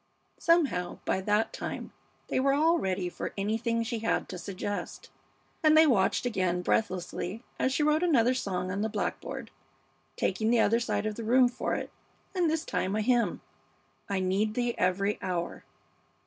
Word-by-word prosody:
Somehow 285 - +2
by 190 - 0
that 210 +3 +1
time - - -5 0.3
they - - 0
were 275 +1 +3
all 325 +3 +3
ready 185 -1 -1
for 175 - -5
anything 230 +3 0
she 230 0 -3
had 225 - 0
to 180 - -6
suggest, 200 +2 -5 0.5
and 310 -1 +5
they 320 - +8
watched 230 -5 +2
again 185 -6 0
breathlessly 185 +2 -1 0.2
as 260 - +2
she 295 - +1
wrote 305 +1 +3
another 255 -9 +4
song 185 -7 -2
on 200 +2 -2
the 220 - 0
blackboard, 225 +3 -4 0.6
taking 215 +4 0
the 235 0 +4
other 230 +2 +4
side 230 -2 -1
of 215 -1 -3
the 230 - -4
room 250 +3 +5
for 245 - -2
it, - - -5 0.4
and 355 -4 +2
this 320 +1 -1
time 190 +2 -1
a 215 - +1
hymn 240 +1 +1 0.7
"I 200 -1 0
Need 200 +4 0
Thee 240 -1 0
Every 195 +3 0
Hour." 175 -2 -3
220 Hz, 170 wpm, -29 LUFS, 190-255 Hz, 0.7 s, they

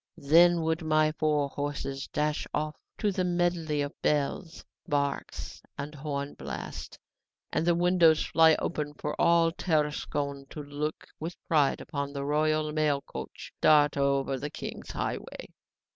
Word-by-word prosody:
"Then 170 +3 +5
would 160 +1 0
my 155 -1 +3
four 150 -2 +1
horses 140 -1 -4
dash 150 +1 -1
off 150 0 -2 0.2
to 210 - +1
the 185 -1 -1
medley 175 -4 0
of 145 - -5
bells, 150 +4 -1 0.2
barks, 140 -1 -2 0.2
and 145 +2 -5
horn 140 -1 -4
blasts, - - -7 0.6
and 165 - 0
the 175 - +4
windows 175 -2 +4
fly 160 -1 +5
open 150 -2 -3
for 150 - -4
all 170 -1 +4
Tarascon 150 -4 -1
to 150 - -7
look 145 +2 -4
with 165 +3 -5
pride 150 -4 +3
upon 140 -2 -4
the 140 -1 -3
royal 155 +1 +1
mail 150 -2 +1
coach - - -8
dart 150 -1 +5
over 140 -1 +1
the 145 - -4
king's - - -7
highway. - - -4
150 Hz, 145 wpm, -29 LUFS, 145-160 Hz, 0.6 s, Then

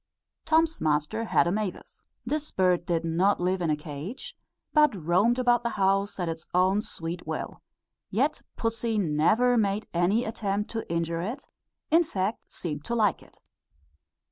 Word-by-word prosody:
Tom's 320 0 +2
master 150 +8 0
had 195 - +3
a 170 - +1
mavis. 205 -2 -4 0.2
This 300 +4 -2
bird 180 -2 +1
did 165 -1 0
not 180 +5 +2
live 180 +1 0
in 170 - 0
a 155 - +3
cage, 155 - -7 0.4
but 300 -5 +5
roamed 185 +8 +2
about 245 -1 +3
the 235 - -1
house 195 +1 +1
at 175 - -1
its 165 -1 -5
own 190 +3 +3
sweet 165 -3 -5
will; - - -5 0.5
yet - - 0
pussy 230 0 -1
never 210 +8 +3
made 205 0 0
any 185 +7 +2
attempt 210 -2 -2
to 225 -6 -4
injure 170 0 -1
it; 235 +10 -5 0.4
in 330 +2 +6
fact, 200 - -3
seemed 150 -4 -5
to 235 - -2
like 210 -5 +2
it. - - -20
195 Hz, 160 wpm, -27 LUFS, 170-230 Hz, 0.5 s, in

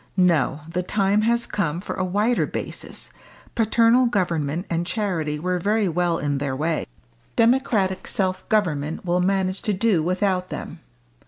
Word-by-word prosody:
No! 160 -5 +2
the 170 +2 -2
time 200 +2 +1
has 235 0 +2
come 170 -5 -2
for - - -5
a 185 - -2
wider 210 +6 +1
basis. - - -6 0.4
Paternal 230 +2 +4
government 170 -6 -1
and 170 0 -1
charity 175 -7 -2
were 180 +2 -1
very 210 +3 +1
well 175 0 +1
in 145 -3 -1
their 135 -2 -2
way 155 +3 -1 0.5
democratic 230 -6 +2
self 185 -2 -2
government 160 -7 0
will 180 0 +1
manage 190 0 0
to 210 - 0
do 200 -3 +2
without 185 +2 0
them!" - - -7
185 Hz, 150 wpm, -23 LUFS, 165-210 Hz, 0.5 s, Paternal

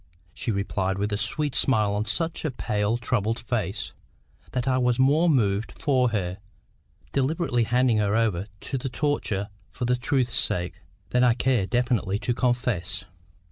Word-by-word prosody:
she - - -4
replied, 100 -2 -1
with 105 +1 -1
a - - +2
sweet 145 +7 0
smile 110 -6 +3
on 105 +1 -1
such 160 +9 -1
a 155 - 0
pale 105 -3 -1
troubled 115 -2 0
face, 110 -4 -3 0.6
that 125 0 -2
I 130 -1 +2
was 125 -1 +2
more 150 +6 +4
moved 105 - +1
for 130 -4 +2
her, 95 -4 -2 0.7
deliberately 135 -3 +1
handing 120 -1 +2
her 105 0 +1
over 105 -5 +1
to 135 - -3
the 130 - -3
torture 120 -8 -1 0.2
for 125 - -4
the 125 +1 +2
truth's 125 0 0
sake, 90 +2 -1 0.3
than 125 0 +3
I 120 -2 +5
care 125 -6 +1
definitely 120 -5 +1
to 120 +2 -1
confess. 120 -8 -1
120 Hz, 160 wpm, -25 LUFS, 105-130 Hz, 0.7 s, I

